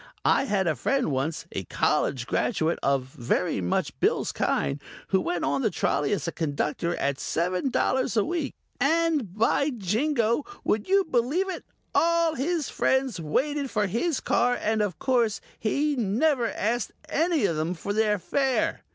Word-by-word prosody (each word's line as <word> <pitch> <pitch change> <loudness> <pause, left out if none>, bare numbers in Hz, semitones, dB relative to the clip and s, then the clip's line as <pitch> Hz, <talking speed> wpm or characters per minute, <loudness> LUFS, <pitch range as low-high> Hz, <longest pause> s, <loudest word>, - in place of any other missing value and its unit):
I 275 - +4
had 200 -6 +1
a 160 -3 +1
friend 270 - 0
once 140 +4 -2
a - - -3
college 130 -4 0
graduate 165 - 0
of 135 -1 +2
very 130 - -1
much 90 - -1
Bill's - - +1
kind 140 +1 -1 0.3
who 190 -1 +3
went 175 -2 -2
on 140 0 0
the - - +2
trolley 145 - 0
as 200 - -1
a - - -1
Conductor 160 +2 -1
at 140 -1 -1
seven 180 - -1
dollars 255 -2 +1
a 210 - +3
week 325 -3 -2 0.2
and, 300 - +1
by 255 +6 +2
Jingo, 235 - 0 0.2
would 215 - 0
you 395 0 +5
believe 315 +6 0
it, - - -7 0.3
all 335 -1 +3
his 315 +3 -1
friends 265 -7 0
waited 275 - -1
for 210 -3 +1
his 250 - 0
car 245 +1 +2
and 215 0 0
of 195 -6 -1
course 240 -5 +1 0.2
he 285 +7 +1
never 240 +3 +1
asked 225 +1 -1
any 325 - +1
of 165 -5 0
'em 165 +3 -1
for 200 +4 -4
their 215 -1 +2
fare. 265 +7 0
225 Hz, 165 wpm, -26 LUFS, 175-280 Hz, 0.3 s, you